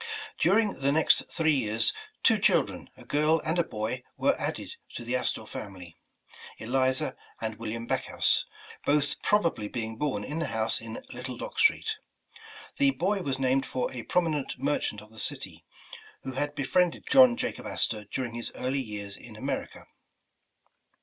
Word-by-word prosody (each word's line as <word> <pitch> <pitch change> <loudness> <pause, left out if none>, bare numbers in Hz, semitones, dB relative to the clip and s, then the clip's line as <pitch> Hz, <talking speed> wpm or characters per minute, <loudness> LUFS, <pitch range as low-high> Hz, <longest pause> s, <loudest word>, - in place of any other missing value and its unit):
During 205 +4 +3
the 140 +1 +2
next 160 +2 +4
three 160 -2 +2
years, 110 -4 +2 0.3
two - - +5
children, - - +2
a - - -13
girl 155 +2 +3
and 160 +3 +1
a - - +4
boy 110 0 -3
were - - +3
added - - -3 0.2
to 120 - -5
the 120 +2 0
Astor 125 - -1
family, 90 -4 -8 0.6
Eliza 130 +3 +1 0.2
and 110 -1 -4
Wil 115 -1 -4
liam 115 +1 -4
Backhouse, - - +2 0.4
both 145 0 +2
probably 170 - +2
being 110 -1 -4
born 120 -7 -1
in 150 +8 -4
the 165 - -1
house 110 0 0
in 115 0 -7
Little 125 0 -6
Dock - - -6
Street. 450 -1 +3 0.8
The 280 0 +8
boy 200 -5 0
was 135 -6 -1
named 135 0 +1
for 125 - -2
a 125 - -5
promi 170 +8 +1
nent 145 -3 -3
merchant 135 -6 -1
of 110 0 -16
the 110 - -11
city, - - -4 0.6
who 135 - -4
had 145 +3 -2
befriended 165 +5 +1
John 255 -2 +7
Jacob 250 - -3
Astor 105 -2 +1
during 120 +3 -4
his 120 0 -3
early 130 +2 -1
years 105 -4 -6
in - - -12
America. - - -4
130 Hz, 165 wpm, -28 LUFS, 110-160 Hz, 0.8 s, The